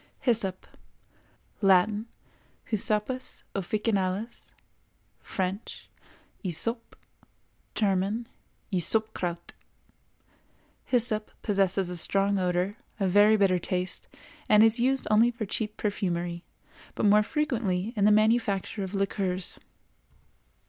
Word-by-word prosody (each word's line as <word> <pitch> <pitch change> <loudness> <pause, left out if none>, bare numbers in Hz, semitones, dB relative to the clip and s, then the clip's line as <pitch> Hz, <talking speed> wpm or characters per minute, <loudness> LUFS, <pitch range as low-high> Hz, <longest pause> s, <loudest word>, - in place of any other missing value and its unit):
HYSSOP. 210 -7 0 1.0
Latin—Hyssopus 210 +3 -1
officinalis; 205 +1 -2 0.7
French—Hyssope; 195 +2 -5 0.8
German—Ysopkraut. 195 -2 -2 1.3
Hyssop 225 -3 +2
possesses 195 -2 +1
a 180 - -5
strong 195 +3 +1
odor, 180 +3 0 0.2
a 195 - +1
very 205 +3 +5
bitter 190 -3 +3
taste, 180 +1 -3 0.4
and 210 0 +7
is 225 +2 +4
used 265 +2 +1
only 225 +3 +5
for 235 -2 -4
cheap 210 +2 -3
perfumery, 175 -4 -2 0.5
but - - 0
more 210 +1 +6
frequently 225 - -1
in 205 - 0
the 210 - +6
manufacture 215 -1 +2
of 190 +1 -4
liqueurs. 190 -2 -1
205 Hz, 85 wpm, -27 LUFS, 185-220 Hz, 1.3 s, and